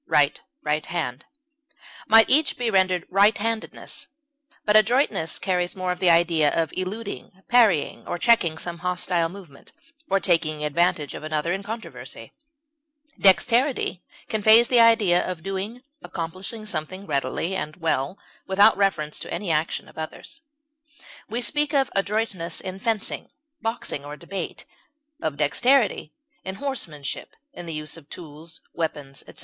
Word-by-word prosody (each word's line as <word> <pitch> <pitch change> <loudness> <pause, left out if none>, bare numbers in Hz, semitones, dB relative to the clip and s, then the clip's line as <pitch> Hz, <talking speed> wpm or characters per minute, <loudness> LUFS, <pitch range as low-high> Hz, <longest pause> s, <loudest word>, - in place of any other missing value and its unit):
dexter, - - -22
right, 145 0 +3 0.2
right 150 0 0
hand) 130 -7 -3 0.8
might 225 0 +7
each 295 +3 +3
be 240 -2 0
rendered 185 -3 +2
"right 200 +3 +5
handedness;" 225 +1 -3 0.6
but 210 - +3
adroitness 215 - +3
carries 180 -2 -1
more 185 -1 -1
of 180 - -4
the 180 -1 +4
idea 165 -3 +4
of 165 - -1
eluding, 195 +5 -5 0.2
parrying, 220 -11 +3
or - - -2
checking 175 -6 +3
some 170 0 -5
hostile 175 -1 0
movement, 175 -7 -13 0.4
or 195 - +3
taking 155 -5 +1
advantage 150 -1 +1
of - - -8
another 155 +2 -1
in 195 - -3
controversy; 225 +3 -8 0.9
dexterity 200 - +3 0.3
conveys 220 +2 +5
the 245 - +5
idea 220 -6 +5
of 180 -3 -5
doing, 195 +6 -4 0.2
accomplishing 185 - -6
something 185 0 -4
readily 145 +4 -1
and 155 -4 -4
well, 160 0 -1 0.3
without 200 +3 +5
reference 175 -7 0
to - - -7
any 195 -5 -2
action 155 +1 -1
of - - -12
others. 330 - -7 0.9
We 235 +3 -2
speak 295 +3 0
of 270 -2 +2
adroitness 195 -4 0
in 190 0 -5
fencing, 220 -1 -1 0.3
boxing, 225 -10 -3
or 145 +1 -8
debate; 195 +4 -5 0.6
of 155 -3 -2
dexterity 215 - +2 0.3
in 190 0 -5
horsemanship, 175 - -4 0.2
in 175 -7 -9
the 165 - -4
use 155 +1 -3
of 155 -3 -15
tools, 160 0 -9
weapons, 145 -4 -4
etc. - - -12
185 Hz, 145 wpm, -24 LUFS, 160-220 Hz, 0.9 s, might